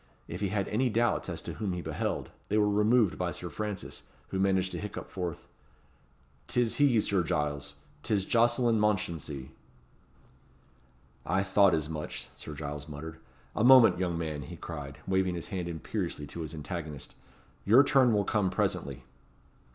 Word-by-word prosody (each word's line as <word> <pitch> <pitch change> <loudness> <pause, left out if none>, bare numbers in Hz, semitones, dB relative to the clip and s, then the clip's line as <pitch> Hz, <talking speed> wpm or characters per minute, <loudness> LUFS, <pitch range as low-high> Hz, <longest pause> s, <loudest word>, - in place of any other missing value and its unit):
If 90 +4 -6
he 100 - +1
had 100 0 -1
any 125 +4 +1
doubts 120 +1 +1
as - - -4
to - - -5
whom 100 -4 -2
he 90 - -3
beheld, - - -3 0.2
they 105 - +2
were 105 -1 +4
removed 105 0 +3
by - - 0
Sir - - -6
Francis, 105 -3 -5 0.3
who 95 - -2
managed 95 -1 +2
to - - -4
hiccup 105 - -6
forth 90 -4 -4 1.0
"'Tis 120 -2 +1
he, 140 -6 +5
Sir 100 -3 +1
Giles 75 -3 -2 0.3
'tis 100 -1 0
Jocelyn 120 0 +3
Mounchensey." 85 -10 -1 1.7
"I 95 +1 +1
thought 100 -1 +4
as 75 -1 -2
much," 75 -1 -6
Sir 75 - -9
Giles 75 0 -6
muttered. 80 +2 -7 0.4
"A - - +1
moment, 120 -8 +8
young 90 -3 0
man," 80 -3 -3
he 65 - -8
cried, 75 -4 -7
waving 95 -1 +1
his 85 - -5
hand 90 -4 -3
imperiously 80 -2 -3
to 85 - -7
his 80 0 -5
antagonist. 75 -4 -6 0.5
"Your 120 +7 +7
turn 135 -4 +4
will 105 -2 +2
come 105 -4 +1
presently." 90 - -2
95 Hz, 160 wpm, -30 LUFS, 80-105 Hz, 1.7 s, moment